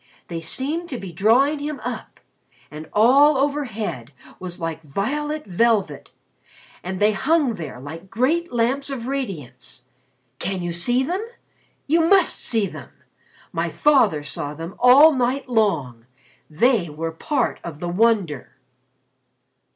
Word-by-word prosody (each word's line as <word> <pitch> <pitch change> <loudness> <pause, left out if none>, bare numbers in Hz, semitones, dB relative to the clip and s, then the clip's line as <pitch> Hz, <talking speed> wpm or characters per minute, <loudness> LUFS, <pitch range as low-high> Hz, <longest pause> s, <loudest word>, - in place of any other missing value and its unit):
They 165 -1 -4
seemed 295 - -3
to 255 - -4
be 195 -5 -8
drawing 240 - +3
him 295 0 -4
up. - - -6 0.5
And 155 +1 -9
all 275 +7 +5
overhead 225 - -2 0.3
was 180 -1 -6
like 165 -1 -4
violet 295 - -3
velvet, 200 -5 0 0.7
and 185 +1 -5
they 210 +1 +4
hung 275 +4 +1
there 155 - -7
like 160 +7 -9
great 305 - 0
lamps 250 +4 0
of 260 -4 -5
radiance. 155 - -6 0.6
Can 185 0 -3
you 175 -1 -3
see 245 +10 +1
them? 365 +9 -2 0.6
You 330 +4 +3
must 370 +1 +3
see 225 -3 +1
them. - - -9 0.6
My - - -2
father 225 - +3
saw 145 0 -4
them 165 +4 -7
all 275 +6 +7
night 260 +1 -1
long. 155 - 0 0.4
They 190 - +2
were 160 +2 -4
part 265 - -1
of 165 -4 -7
the 175 - -4
wonder." 190 - +1
220 Hz, 135 wpm, -22 LUFS, 165-275 Hz, 0.7 s, all